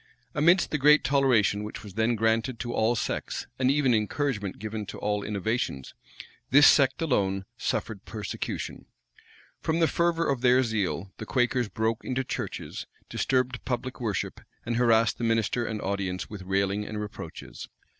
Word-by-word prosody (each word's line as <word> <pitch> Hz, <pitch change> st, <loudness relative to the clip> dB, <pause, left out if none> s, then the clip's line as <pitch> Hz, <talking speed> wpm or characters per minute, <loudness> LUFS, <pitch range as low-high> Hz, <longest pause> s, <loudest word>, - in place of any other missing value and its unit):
Amidst 170 Hz, +5 st, +4 dB
the 150 Hz, -, 0 dB
great 150 Hz, +2 st, +6 dB
toleration 125 Hz, -6 st, +3 dB
which 105 Hz, 0 st, -7 dB
was 100 Hz, -3 st, -10 dB
then 110 Hz, +3 st, +1 dB
granted 115 Hz, +3 st, +1 dB
to 120 Hz, +1 st, -4 dB
all 110 Hz, +2 st, +2 dB
sects, 110 Hz, -, -3 dB
and 130 Hz, 0 st, +3 dB
even 135 Hz, -3 st, +3 dB
encouragement 110 Hz, -2 st, -1 dB
given 110 Hz, +1 st, -4 dB
to -, -, -7 dB
all 105 Hz, 0 st, -1 dB
innovations, 105 Hz, -, -2 dB, 0.6 s
this 145 Hz, +2 st, +7 dB
sect 140 Hz, +3 st, +5 dB
alone 95 Hz, -10 st, 0 dB
suffered 105 Hz, -2 st, -3 dB
persecution. 110 Hz, -3 st, -5 dB, 0.7 s
From 160 Hz, 0 st, 0 dB
the 165 Hz, -, +4 dB
fervor 170 Hz, 0 st, +1 dB
of 135 Hz, -3 st, 0 dB
their 125 Hz, +1 st, +5 dB
zeal, 100 Hz, -5 st, -2 dB
the -, -, -7 dB
Quakers 125 Hz, -2 st, +1 dB
broke 110 Hz, 0 st, -1 dB
into 130 Hz, +1 st, -1 dB
churches, -, -, -5 dB, 0.2 s
disturbed 125 Hz, -2 st, 0 dB
public 125 Hz, +1 st, -3 dB
worship, 110 Hz, -4 st, -2 dB, 0.2 s
and 115 Hz, 0 st, -1 dB
harassed 115 Hz, -2 st, +3 dB
the -, -, -3 dB
minister 115 Hz, +1 st, +1 dB
and 110 Hz, -1 st, -3 dB
audience 95 Hz, -2 st, -2 dB
with 105 Hz, -2 st, -8 dB
railing 100 Hz, +2 st, 0 dB
and 105 Hz, 0 st, -5 dB
reproaches. 105 Hz, -1 st, -8 dB
115 Hz, 155 wpm, -27 LUFS, 105-130 Hz, 0.7 s, this